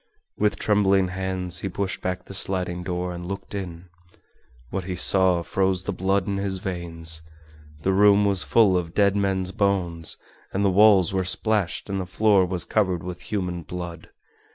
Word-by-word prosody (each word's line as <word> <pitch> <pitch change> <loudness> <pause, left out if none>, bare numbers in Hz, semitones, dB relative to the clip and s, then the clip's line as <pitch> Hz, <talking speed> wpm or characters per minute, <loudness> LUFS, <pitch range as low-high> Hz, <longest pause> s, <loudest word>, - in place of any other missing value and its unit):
With 105 -1 0
trembling 100 -3 +2
hands 90 -2 -3
he 95 - -4
pushed 95 +1 -4
back 90 0 -3
the - - -10
sliding 90 -2 +1
door 90 0 -3
and 85 0 -7
looked 100 +2 -7
in. 90 -3 -6 0.8
What 95 -2 -3
he 90 0 -4
saw 90 -1 +4
froze 95 0 0
the - - -3
blood 95 0 0
in 100 0 -2
his 100 -1 -1
veins. 85 -3 -1 0.6
The 95 - +1
room 100 +1 +5
was 100 -2 +2
full 105 -5 +3
of 85 -2 -3
dead 100 -1 +3
men's 95 -2 -1
bones 90 -5 -1 0.4
and 100 +1 0
the 95 - +3
walls 100 -2 +5
were 95 -1 0
splashed 100 0 -1
and 95 -1 -2
the 90 - -6
floor 95 0 +3
was 90 -2 -3
covered 95 -5 0
with 90 -1 -7
human 90 -4 -3
blood. 85 0 -8
95 Hz, 175 wpm, -24 LUFS, 90-100 Hz, 0.8 s, room